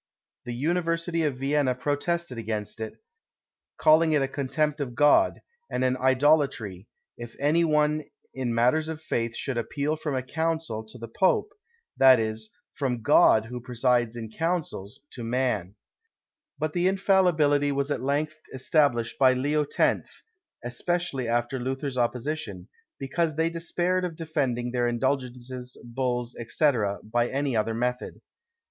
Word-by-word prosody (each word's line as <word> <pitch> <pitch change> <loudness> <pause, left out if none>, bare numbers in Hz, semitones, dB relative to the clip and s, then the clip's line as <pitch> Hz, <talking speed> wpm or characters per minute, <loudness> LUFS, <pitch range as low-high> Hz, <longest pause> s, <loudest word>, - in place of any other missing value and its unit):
The 120 -1 -4
university 165 +3 0
of 140 -4 -1
Vienna 135 -1 +1
protested 145 0 -2
against 110 -1 -4
it, 110 0 -5 0.8
calling 155 +1 +5
it 145 -2 +3
a - - 0
contempt 150 +2 -1
of 125 -4 -4
God, 145 - +4 0.3
and - - -1
an 130 0 +2
idolatry, 130 - +2 0.3
if 120 -1 -8
any 155 +4 +3
one 150 -1 +2 0.3
in 130 -2 -2
matters 125 +7 +2
of 160 -1 -5
faith 115 -7 -2
should 130 -4 -2
appeal 145 +5 -2
from 150 -3 -3
a 130 - -1
council 160 -5 -2
to 110 +3 -11
the 115 -1 -7
Pope; 185 - +2 0.5
that 130 -2 +7
is, 110 0 -3 0.2
from 125 -5 -2
God 110 0 +5
who 125 +1 -7
presides 120 -1 +1
in 110 -2 -6
councils, 160 - -3
to 120 - -7
man. 115 -6 -1 0.8
But 155 -1 -2
the 175 +1 +2
infallibility 175 -7 +3
was 140 +1 -1
at - - -1
length 150 +3 -1 0.2
established 130 -4 +1
by 130 -1 +6
Leo 145 +3 0
X., - - 0 0.4
especially 135 +1 -2
after 120 +3 0
Luther's 130 +1 -3
opposition, 120 - -2 0.3
because 155 +3 -1
they 165 +1 +1
despaired 175 +2 -1
of 175 -3 -3
defending 135 -7 -2
their 120 -1 +1
indulgences, 125 0 -3
bulls, 120 0 -2
&c., 150 +4 +3 0.3
by 120 +2 0
any 140 -2 -1
other 110 +1 0
method. 125 +2 -2
135 Hz, 140 wpm, -26 LUFS, 120-155 Hz, 0.8 s, that